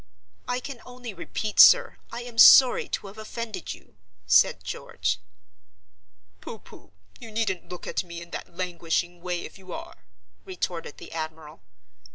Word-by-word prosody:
"I 250 0 -1
can 255 -2 -8
only 250 -3 -9
repeat, 205 +4 -4
sir, - - +8
I 240 - -6
am 240 -1 -7
sorry 255 +1 +8
to - - -3
have 200 +2 -11
offended 215 -3 -6
you," 105 - -22 0.3
said 90 0 +4
George. 95 - -3 1.2
"Pooh! 225 - -8
pooh! - - -17 0.3
you 235 -3 -10
needn't 215 -5 -2
look 180 - -8
at - - -2
me 170 -1 -8
in 170 0 -12
that - - -7
languishing 175 -1 -2
way 175 -1 -3
if - - -10
you 185 -1 -12
are," 90 - -9 0.4
retorted 175 -4 -5
the - - -11
admiral. 160 -1 -7
185 Hz, 155 wpm, -26 LUFS, 170-230 Hz, 1.2 s, sir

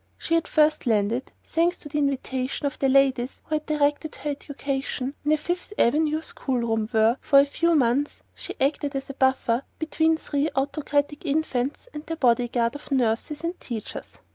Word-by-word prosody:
She - - -3
had 330 0 +2
first 305 -3 +2
landed 225 +3 +1
thanks 340 +2 +1
to - - -10
the 295 +1 -1
intervention 270 -1 -1
of 285 - -2
the 270 - +2
ladies 265 -2 +2
who - - -5
had 305 0 -1
directed 295 0 0
her 290 +2 -3
education 275 -1 -3
in 295 - +1
a 310 - +4
Fifth 350 +6 -3
Avenue 305 +5 +2
school 265 -5 -2
room 225 -2 0
where, 225 +2 +3
for 280 - +4
a 280 - +8
few 335 +4 +1
months, 275 +1 +1
she - - -7
acted 285 +1 0
as 270 0 -3
a - - -10
buffer 265 -3 +2 0.2
between 320 0 +1
three 295 -1 -1
autocratic 285 +1 -1
infants 285 - -1
and 300 - -6
their 325 - -3
bodyguard 240 -2 +2
of 290 - -10
nurses 260 +3 0
and 340 +2 -3
teachers. 230 -4 -6
280 Hz, 180 wpm, -25 LUFS, 255-305 Hz, 0.2 s, a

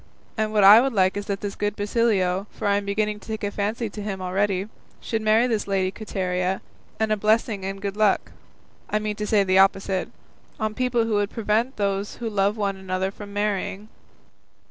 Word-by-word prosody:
What 215 -2 +1
I 205 +4 +10
would 270 0 0
like 190 -2 +3
is 205 0 -4
that 200 -1 -3
this 205 -1 -3
good 205 0 -2
Basilio 205 -3 +1
(for - - -4
I 200 0 +3
am 205 - -3
beginning 210 +1 -1
to - - -16
take 220 -1 -5
a 205 - -1
fancy 215 +3 -2
to 210 - -7
him 200 -2 -4
already) 190 +1 0 0.3
should 225 -1 -3
marry 215 +2 +4
this 225 -5 -1
lady 190 -1 0
Quiteria; 185 -3 -2 0.4
and 220 -1 +1
a - - +4
blessing 215 -1 +1
and 195 +1 -4
good 200 0 -4
luck 210 -2 +2 0.6
I 210 - +1
meant 215 0 -3
to 210 - -2
say 205 -2 +4
the 190 0 +3
opposite 195 -1 +2 0.5
on 215 -1 -1
people 250 -1 +1
who 225 - -1
would 205 -1 +1
prevent 225 +3 0
those 200 0 -1
who 230 -2 -4
love 200 +1 +1
one 200 -2 -1
another 190 0 -2
from 205 0 -10
marrying." 205 0 -2
205 Hz, 200 wpm, -24 LUFS, 195-215 Hz, 0.6 s, I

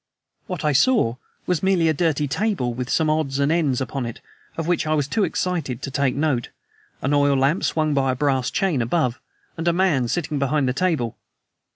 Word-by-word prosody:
What 180 -6 -4
I 150 - +3
saw 140 - +3 0.3
were 180 - +1
merely 190 -3 +2
a 160 - +3
dirty 155 -2 0
table, 160 - -1
with 125 +1 -5
some 160 - +2
odds 155 -3 0
and 140 +2 +2
ends 150 -7 +1
upon 130 -1 -3
it 115 - -7 0.4
of 165 - -2
which 175 -2 0
I 155 - +2
was 145 -3 0
too 210 +8 0
excited 160 -11 -2
to 140 - -4
take 140 -1 0
note, 140 -5 0 0.5
an 140 - +1
oil 145 -1 +3
lamp 140 +7 +2
swung 155 -1 +1
by 135 -2 +2
a - - -2
brass 135 -2 +1
chain 175 -10 0
above, 125 0 0 0.4
and 165 +1 -3
a 170 - +4
man 170 -9 +2
sitting 150 +1 -2
behind 140 0 +1
the 125 - +1
table. 145 - -1
145 Hz, 205 wpm, -22 LUFS, 130-165 Hz, 0.5 s, a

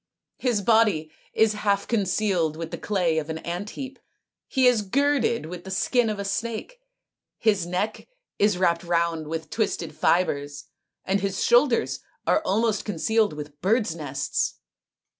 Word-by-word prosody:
His 235 -6 0
body 210 -8 +3 0.2
is 220 -1 +3
half 200 -1 0
concealed 190 -7 +1
with 165 -1 -5
the - - -4
clay 175 -6 +1
of 155 0 -6
an 160 - -3
ant 175 +5 -4
heap; 270 0 -6 0.5
he 265 -3 +2
is 245 -3 +5
girded 250 - +1
with 175 +2 -7
the 190 - -9
skin 225 +5 +1
of 210 - -2
a 200 - -4
snake; 230 - -3 0.6
his 205 -6 +1
neck 185 +5 -2 0.3
is 205 -2 +3
wrapped 170 -1 +2
round 170 -2 0
with 160 0 -5
twisted 170 -8 -2
fibres; 145 -6 +1 0.4
and 195 +1 +1
his 195 0 -1
shoulders 240 0 +3 0.3
are - - +3
almost 220 -6 +1
concealed 215 +1 +1
with 150 -1 -9
birds' 210 -3 +1
nests." 140 -4 -2
195 Hz, 150 wpm, -25 LUFS, 165-225 Hz, 0.6 s, is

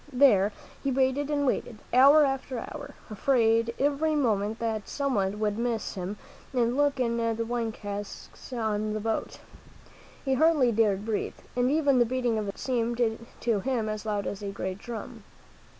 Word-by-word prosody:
There 245 -7 +5 0.3
he 275 - +1
waited 265 +2 +1
and 290 -1 +1
waited, 245 -3 -1 0.2
hour 280 +4 +7
after 270 -1 -2
hour, 290 +4 -7 0.2
afraid 230 0 +2
every 290 +3 +1
moment 220 -6 +1
that 220 -3 -3
someone 210 -8 -1
would 210 0 0
miss 235 -2 -1
him 190 +2 -5 0.4
and 240 -1 +1
look 285 -1 +2
in 235 -2 +1
the 230 0 0
wine 235 -1 -1
casks 205 +4 -8
on 215 -3 -1
the 215 - -2
boat. 225 +1 -2 0.9
He 270 - +2
hardly 290 -3 +4
dared 210 -2 +2
breathe, 220 -2 -2 0.2
and 245 0 +2
even 285 -3 +3
the 240 - +5
beating 245 -2 0
of 210 - -3
his 200 - -4
heart - - -22 0.4
seemed 225 -2 +1 0.2
to 230 -4 +1
him 240 -1 -1
as 215 -1 -3
loud 210 -2 -2
as 200 - -4
a 205 - -4
great 190 -1 -4
drum. 235 0 -7
230 Hz, 170 wpm, -28 LUFS, 215-265 Hz, 0.9 s, hour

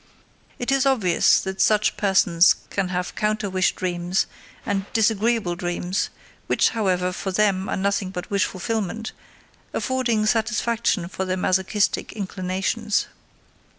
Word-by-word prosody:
It 245 +2 -2
is 275 0 +3
obvious 210 -11 +4
that 190 0 -3
such 210 -1 +3
persons 185 -3 +4 0.2
can 195 -2 0
have 180 0 -3
counter 215 -1 -1
wish 185 -1 +1
dreams 180 +1 -1 0.4
and 195 -1 -2
disagreeable 225 -3 +2
dreams, 175 +2 -2 0.4
which, - - +3
however, 185 -5 0
for 190 +1 -4
them 195 -1 +1
are - - -1
nothing 195 0 0
but 180 0 -7
wish 200 -1 +2
fulfillment, 220 +2 -3 0.6
affording 245 -5 0
satisfaction 220 -3 0
for 190 +1 -4
their 185 0 -1
masochistic 190 +3 0
inclinations. 195 +2 -1
195 Hz, 125 wpm, -23 LUFS, 185-220 Hz, 0.6 s, obvious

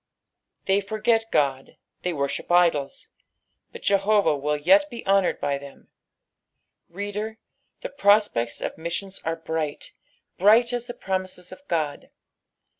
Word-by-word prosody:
They 195 +1 +2
forget 220 +2 +1
Qod, 135 -2 0 0.3
they 180 - -1
worship 140 +1 -3
idols, 170 -6 +2 0.6
but - - -11
Jehovah 200 -4 +3
will 150 +1 -1
yet 295 - +4
be 235 -3 -8
honoured 195 -1 +2
by 140 -1 -1
them. 140 0 -14 1.0
Reader, 205 +4 -5 0.4
the - - -5
prospects 200 - +2
of - - -4
missions 190 +4 -4
are 165 0 -1
bright, 160 -2 -4 0.5
bri)^ht 225 +5 +5
as 245 0 -3
the 240 - -7
promises 185 -3 -4
of - - -11
Ood. 155 -4 -2
185 Hz, 125 wpm, -24 LUFS, 150-210 Hz, 1.0 s, bri)^ht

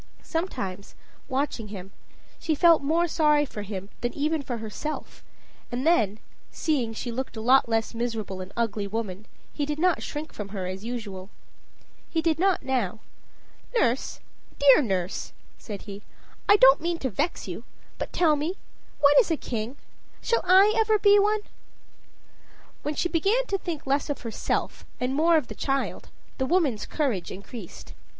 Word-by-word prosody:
Sometimes, 200 - -4 0.3
watching 260 -4 -1
him, 195 -2 -8 0.5
she 320 -1 0
felt 335 +1 +6
more 325 +5 +2
sorry 300 -2 +3
for 215 -6 -7
him 200 -1 -6
than 240 0 -1
even 305 +1 0
for 250 -3 -4
herself; 225 +8 -6 0.5
and 250 +3 -2
then, 220 - +3 0.3
seeing 275 -8 0
she 235 +2 -4
looked 255 -1 -4
a - - -3
less 230 -2 +3
miserable 225 -5 -3
and 185 +1 -8
ugly 220 -3 -1
woman, 210 -1 -4 0.3
he 295 - -2
did 295 +1 -2
not 355 +1 +2
shrink 300 +1 -5
from 210 -2 -6
her 195 -2 -4
as 185 +2 -5
usual. 210 -5 -5 0.8
He 330 - 0
did 320 -1 +1
not 380 0 +2
now. 235 -6 -1 0.7
"Nurse 250 - +1 0.4
dear 280 0 +7
nurse," 190 -6 -2 0.3
said 205 -4 -7
he, 200 -1 -8 0.5
"I 410 - +9
don't 270 -7 +7
mean 340 +1 -1
to 260 -6 -2
vex 300 - -2
you, - - -6 0.4
but - - -4
tell 320 -4 +3
me 310 +6 -2 0.5
what 285 0 +7
is 470 - +3
a 325 - +1
king? 235 +2 -4 0.4
shall 465 - +1
I 380 +4 +6
ever 440 -1 +4
be 410 0 +6
one?" 420 +1 +2 1.4
When 295 +1 -3
she 350 - +1
began 395 +9 +2
to 395 - -1
think 340 -6 -5
less 275 +2 0
of 285 - -3
herself 230 -2 -2 0.2
and 250 +1 -1
more 325 +3 +4
of 305 - 0
the - - -7
child, 275 0 -2 0.3
the 260 - +1
woman's 295 - +1
courage 255 - -1
increased. 200 0 -9
270 Hz, 160 wpm, -26 LUFS, 220-325 Hz, 1.4 s, I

